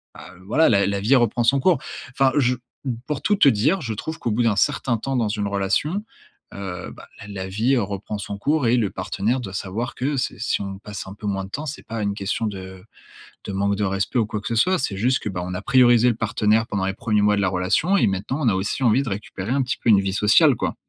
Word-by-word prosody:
bah, 90 Hz, -, -12 dB
voilà 155 Hz, +10 st, +3 dB
la 100 Hz, -3 st, +3 dB
la 100 Hz, 0 st, -1 dB
vie 125 Hz, +7 st, +4 dB
reprend 120 Hz, -1 st, +2 dB
son 140 Hz, +3 st, +4 dB
cours». 175 Hz, -2 st, +4 dB, 0.3 s
Enfin, 135 Hz, 0 st, +2 dB
je 125 Hz, -2 st, +3 dB, 0.3 s
m 125 Hz, -3 st, -2 dB
pour 150 Hz, -3 st, -3 dB
tout 205 Hz, -, +2 dB
te 145 Hz, -, +6 dB
dire, 145 Hz, -, +2 dB
je 115 Hz, -3 st, -3 dB
trouve 160 Hz, +9 st, -5 dB
qu'au 115 Hz, -, -2 dB
bout 120 Hz, +3 st, +1 dB
d'un 110 Hz, -3 st, +2 dB
certain 120 Hz, -3 st, +1 dB
temps 135 Hz, +4 st, -3 dB
dans 115 Hz, -3 st, +1 dB
une 105 Hz, -1 st, -2 dB
relation, 100 Hz, -, 0 dB, 0.5 s
heu, 95 Hz, -2 st, -6 dB
ben, -, -, -13 dB, 0.2 s
la 100 Hz, -, -10 dB
la 95 Hz, -2 st, -5 dB
vie 115 Hz, +7 st, +1 dB
reprend 100 Hz, 0 st, -3 dB
son 100 Hz, 0 st, -5 dB
cours 145 Hz, +4 st, 0 dB
et 120 Hz, +2 st, +3 dB
le 105 Hz, -5 st, +1 dB
partenaire 110 Hz, +6 st, -2 dB
doit 95 Hz, -6 st, -7 dB
savoir 105 Hz, +6 st, -4 dB
que 140 Hz, +3 st, -1 dB
c'est 125 Hz, -, -2 dB
si 115 Hz, -, -1 dB
on 95 Hz, -1 st, -6 dB
passe 105 Hz, -3 st, -7 dB
un 95 Hz, -, -9 dB
peu 105 Hz, -, -7 dB
moins 95 Hz, -1 st, -1 dB
de -, -, -12 dB
temps, 150 Hz, +2 st, -4 dB
c'est 145 Hz, -, -6 dB
pas 115 Hz, -1 st, -4 dB
une 100 Hz, 0 st, 0 dB
question 105 Hz, +2 st, -2 dB
de 95 Hz, -2 st, -8 dB, 0.6 s
de -, -, -4 dB
manque 100 Hz, +1 st, 0 dB
de 105 Hz, -, -2 dB
respect 95 Hz, +5 st, -1 dB
ou 115 Hz, -, +2 dB
quoi 105 Hz, -, -3 dB
que -, -, -6 dB
ce 115 Hz, -, -1 dB
soit, 185 Hz, +11 st, +3 dB
c'est 100 Hz, -, -2 dB
juste, 125 Hz, +5 st, +2 dB
que, -, -, -4 dB
ben, 90 Hz, -2 st, -4 dB
on 90 Hz, -, -5 dB
a 95 Hz, -, -4 dB
priorisé 125 Hz, -2 st, +5 dB
le 115 Hz, -, 0 dB
partenaire 110 Hz, 0 st, +1 dB
pendant 95 Hz, -2 st, -2 dB
les 95 Hz, -, -1 dB
1ers 105 Hz, -1 st, 0 dB
mois 105 Hz, 0 st, +3 dB
de -, -, +1 dB
la 95 Hz, -, +2 dB
relation 95 Hz, -, +1 dB
et -, -, +3 dB
maintenant 100 Hz, +9 st, -2 dB
on 135 Hz, -, +1 dB
a 95 Hz, -, +1 dB
aussi 105 Hz, +7 st, -2 dB
envie 120 Hz, +3 st, +3 dB
de 120 Hz, -, -4 dB
récupérer 100 Hz, +1 st, -5 dB
un 140 Hz, 0 st, +2 dB
petit 125 Hz, -, -2 dB
peu 115 Hz, -, -1 dB
une 100 Hz, -2 st, +7 dB
vie 95 Hz, -1 st, -2 dB
sociale, 120 Hz, +8 st, +5 dB
quoi. -, -, -2 dB
110 Hz, 265 wpm, -22 LUFS, 100-125 Hz, 0.6 s, une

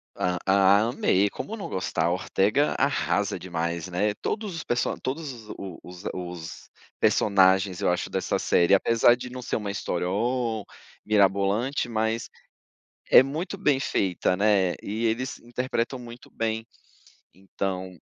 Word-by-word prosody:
Ah 95 Hz, +4 st, +3 dB
amei, 100 Hz, -4 st, +2 dB
como 220 Hz, -, -6 dB
não 205 Hz, -, -6 dB
gostar. 90 Hz, -3 st, -1 dB
A 85 Hz, -, +2 dB
Ortega 100 Hz, +9 st, +1 dB
arrasa -, -, +1 dB
demais, 85 Hz, -1 st, -3 dB
né. 100 Hz, +4 st, 0 dB
Todos 210 Hz, -5 st, -3 dB
os 160 Hz, -, -5 dB
perso 120 Hz, -, 0 dB
todos 145 Hz, +2 st, -3 dB
os 110 Hz, -3 st, -12 dB
o 95 Hz, -4 st, -8 dB
os 90 Hz, +1 st, -11 dB
os 90 Hz, -3 st, -7 dB, 0.3 s
personagens 95 Hz, -2 st, +3 dB
eu -, -, +2 dB
acho 90 Hz, -, -1 dB
dessa -, -, -1 dB
série, 85 Hz, +3 st, +3 dB
apesar 115 Hz, +4 st, +5 dB
de 125 Hz, 0 st, -8 dB
não 125 Hz, 0 st, -7 dB
ser -, -, -3 dB
uma 105 Hz, -2 st, -2 dB
história 90 Hz, -2 st, -2 dB
"oh" 115 Hz, +1 st, -1 dB, 0.4 s
mirabolante, 105 Hz, +6 st, +2 dB
mas 110 Hz, 0 st, -1 dB, 0.8 s
é -, -, +9 dB
muito 160 Hz, +9 st, -4 dB
bem 145 Hz, -8 st, +2 dB
feita, 90 Hz, -5 st, 0 dB
né, 100 Hz, -3 st, +3 dB
e 110 Hz, +3 st, -2 dB
eles 125 Hz, +4 st, -2 dB
interpretam 125 Hz, +1 st, -3 dB
muito 120 Hz, 0 st, -11 dB
bem. 110 Hz, 0 st, -2 dB, 0.7 s
Então 95 Hz, 0 st, -4 dB
105 Hz, 145 wpm, -26 LUFS, 95-120 Hz, 0.8 s, é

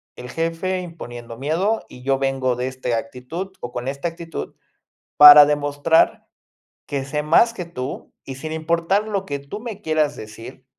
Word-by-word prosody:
el 125 Hz, -, -9 dB
jefe 165 Hz, +5 st, -2 dB
imponiendo 120 Hz, -10 st, -9 dB
miedo, 170 Hz, -, -1 dB
y 125 Hz, -, -13 dB
yo 135 Hz, 0 st, +1 dB
vengo 135 Hz, -2 st, 0 dB
de 125 Hz, +1 st, -3 dB
este 130 Hz, -2 st, -4 dB
actitud 140 Hz, +10 st, -6 dB
o 120 Hz, -, -6 dB
con 120 Hz, +1 st, -5 dB
esta 140 Hz, +5 st, -3 dB
actitud, 165 Hz, 0 st, -7 dB, 0.6 s
para 150 Hz, 0 st, +11 dB
demostrar 145 Hz, +2 st, +1 dB, 0.6 s
que 135 Hz, -2 st, -3 dB
sé 150 Hz, +2 st, -2 dB
más 230 Hz, +9 st, +4 dB
que 180 Hz, -6 st, -6 dB
tú, 135 Hz, -5 st, -7 dB
y 135 Hz, -, -7 dB
sin 155 Hz, +4 st, -7 dB
importar 170 Hz, +5 st, 0 dB
lo 200 Hz, -2 st, -2 dB
que 140 Hz, -4 st, -3 dB
tú 140 Hz, +9 st, -8 dB
me 215 Hz, -3 st, -7 dB
quieras 155 Hz, -3 st, 0 dB
decir, 110 Hz, +2 st, -11 dB
150 Hz, 165 wpm, -21 LUFS, 130-170 Hz, 0.6 s, para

